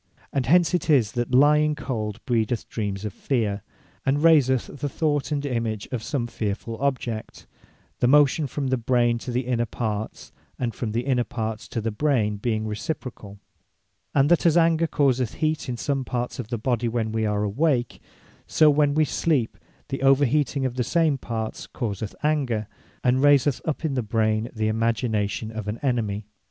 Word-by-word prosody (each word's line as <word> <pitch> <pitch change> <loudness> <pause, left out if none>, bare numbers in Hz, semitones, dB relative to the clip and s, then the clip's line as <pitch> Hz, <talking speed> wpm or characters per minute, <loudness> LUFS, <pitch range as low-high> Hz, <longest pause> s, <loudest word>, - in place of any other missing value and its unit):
And 135 -4 0
hence 175 +3 +4
it 180 - -1
is, 125 -8 +4
that 120 -2 -2
lying 150 +3 +4
cold 115 -6 -4
breedeth 115 -1 0
Dreams 100 -2 -4
of 105 - -4
Feare, 110 -7 -1 0.4
and 140 +3 +1
raiseth 140 -5 +3
the 145 - -2
thought 145 0 -1
and 145 -1 -1
Image 115 -5 -2
of 125 -4 -2
some 120 +1 -2
fearfull 110 0 -4
object 125 -5 -3 0.5
(the 120 - +3
motion 145 +2 +4
from 135 0 -3
the 130 - +1
brain 120 0 +2
to 125 - -8
the 125 +1 0
inner 120 -2 -1
parts, 110 -2 -4 0.3
and 120 -3 -2
from 110 -4 -4
the 115 - +1
inner 125 -1 +1
parts 110 -2 -4
to 115 - -3
the 115 +1 -2
Brain 110 -4 +1
being 110 0 -1
reciprocall:) 110 - -5 0.8
and 140 0 +4
that 175 - +4
as 170 -1 +4
Anger 165 0 +3
causeth 130 -6 +1
heat 155 -3 -1
in 120 - -3
some 135 +2 -1
parts 125 +1 -3
of 125 - -4
the 120 +1 -3
Body, 120 +1 0
when 115 -1 -1
we 110 0 0
are 105 0 0
awake; 120 +3 0 0.5
so 155 -1 +5
when 145 0 +2
we 155 0 +4
sleep, 145 -5 0 0.3
the 135 - -3
over 135 +1 +5
heating 140 0 0
of 130 -1 -3
the 125 - +1
same 155 0 +1
parts 110 -2 -4
causeth 105 -2 -4
Anger, 130 -9 0 0.4
and 125 +1 +3
raiseth 145 -2 +4
up 160 +1 -2
in 150 - 0
the 130 - 0
brain 110 0 0
the 110 -2 -1
Imagination 110 -1 -1
of 110 -2 -6
an 105 +2 -3
Enemy. 110 -6 -1
125 Hz, 180 wpm, -24 LUFS, 110-145 Hz, 0.8 s, so